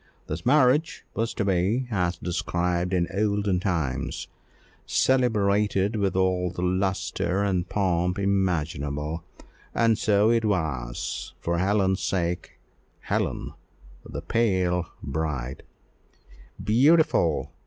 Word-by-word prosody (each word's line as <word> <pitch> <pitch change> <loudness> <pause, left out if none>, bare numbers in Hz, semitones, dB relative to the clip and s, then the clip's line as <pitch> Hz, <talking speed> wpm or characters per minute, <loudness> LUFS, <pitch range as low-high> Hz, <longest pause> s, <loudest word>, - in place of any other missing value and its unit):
This - - -5
marriage 145 +3 +3
was 115 +1 -1
to 105 - -1
be, 100 +7 +1
as 90 -3 0
described 90 0 -1
in 90 -2 +1
olden 100 -2 +1
times, 80 -9 -2 0.6
"celebrated 105 -5 +2
with 100 -3 0
all 95 -1 +1
the 90 +1 -5
lustre 95 0 0
and 90 -3 0
pomp 90 -3 0
imaginable;" 80 -6 -1 0.5
and 115 -2 +3
so 105 +1 +3
it 115 -1 +2
was, 75 - -2
for 85 0 -1
Helen's 95 0 +2
sake, 90 -2 -2 0.5
Helen, - - -2 0.5
the - - -7
pale 95 -6 +1 0.2
bride 70 -3 -3 1.0
"Beautiful!" 135 - +3
95 Hz, 100 wpm, -26 LUFS, 85-105 Hz, 1.0 s, marriage